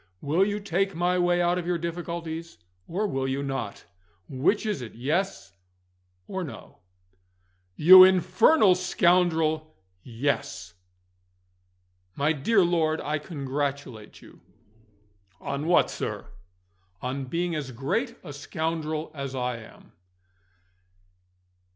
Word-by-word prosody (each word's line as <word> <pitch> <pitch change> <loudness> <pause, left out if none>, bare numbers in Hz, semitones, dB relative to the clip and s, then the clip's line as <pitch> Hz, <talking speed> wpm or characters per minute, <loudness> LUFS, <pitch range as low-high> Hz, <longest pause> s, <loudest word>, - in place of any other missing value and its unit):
Will 160 +6 +1
you 205 +1 -1
take 195 -1 -1
my 180 +2 +1
way 175 0 +2
out 175 +1 +1
of 175 - -6
your 175 -1 +1
difficulties, 170 - -5 0.3
or 195 +6 -2
will 135 -9 -2
you 135 +1 -2
not? 135 -7 -5 0.4
Which 150 - 0
is 210 -9 -2
it 120 - -9
Yes 145 - -2 0.7
or 190 -1 -4
No?" 155 - -10 1.0
"You 185 +4 +10
infernal 185 - +5
scoundrel 170 - +1 0.2
Yes!" 115 -7 -3 1.4
"My 145 +3 +1
dear 190 +8 +2
lord, 160 -2 +1
I 150 +1 -2
congratulate 140 - -5
you." - - -17 1.0
"On 140 +3 -4
what, 175 - +3
sir?" - - -5 0.7
"On 130 +2 -3
being 170 +5 -2
as 150 -4 -4
great 225 - -2
a 150 -5 -8
scoundrel 155 +2 -3
as 140 -3 -6
I 125 -1 -2
am." 110 - -15
160 Hz, 115 wpm, -26 LUFS, 140-180 Hz, 1.4 s, You